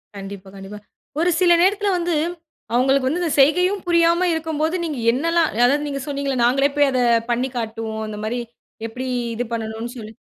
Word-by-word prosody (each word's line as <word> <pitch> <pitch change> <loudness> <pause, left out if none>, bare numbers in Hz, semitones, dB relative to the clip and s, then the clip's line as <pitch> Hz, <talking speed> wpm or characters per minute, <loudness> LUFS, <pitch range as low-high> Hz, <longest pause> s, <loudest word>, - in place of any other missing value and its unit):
கண்டிப்பா, 195 -1 -9
கண்டிப்பா. 195 +2 -9 0.4
ஒரு 345 +2 +2
சில 355 -1 +5
நேரத்தில 405 +2 +2
வந்து 345 0 -1 0.6
அவுங்களுக்கு 260 +2 +2
வந்து 325 +7 -1
இந்த 330 - -1
செய்கையும் 360 +8 +3
புரியாம 340 +1 +3
இருக்கும்போது 320 +1 -1
நீங்க 310 -4 -3
என்னலாம் 330 +5 +1
அதாவது 260 +6 +2
நீங்க 275 -1 -3
சொன்னீங்கள 280 -2 -2
"நாங்களே 270 +4 +3
போய் 290 -1 +4
அத 255 - 0 0.3
பண்ணி 250 +3 0
காட்டுவோம்." 220 -1 -4
அந்த 215 -1 -6
மாரி 235 +3 -2 0.5
எப்பிடி 250 +3 -6 0.3
இது 245 - -2
பண்ணனு 225 +1 -4
சொல்லி. 220 -1 -9
275 Hz, 165 wpm, -21 LUFS, 225-330 Hz, 0.6 s, சில